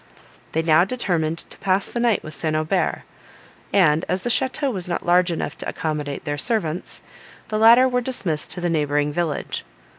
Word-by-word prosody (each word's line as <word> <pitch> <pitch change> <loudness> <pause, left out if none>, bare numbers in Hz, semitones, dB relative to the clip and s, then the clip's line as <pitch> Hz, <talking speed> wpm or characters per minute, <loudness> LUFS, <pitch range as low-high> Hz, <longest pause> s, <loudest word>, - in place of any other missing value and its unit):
They 160 - +1
now 160 +1 +5
determined 175 -8 -1
to - - -12
pass 190 0 0
the 240 - -3
night 235 -3 +2
with 155 - -7
St. 155 +1 -1
Aubert; 155 +4 0 0.7
and 160 -4 +4
as 185 +1 -1
the 240 - 0
château 265 +2 0
was 185 -3 -4
not 175 - -2
large 180 +1 +4
enough 160 -2 -3
to - - -4
accommodate 150 -3 -4
their 145 -1 -2
servants, 180 -5 -2 0.5
the 215 - -1
latter 235 +4 +7
were 250 -1 0
dismissed 195 -12 -2
to 180 - -6
the 175 - 0
neighbouring 145 -2 0
village. 170 -2 -2
175 Hz, 180 wpm, -22 LUFS, 155-215 Hz, 0.7 s, latter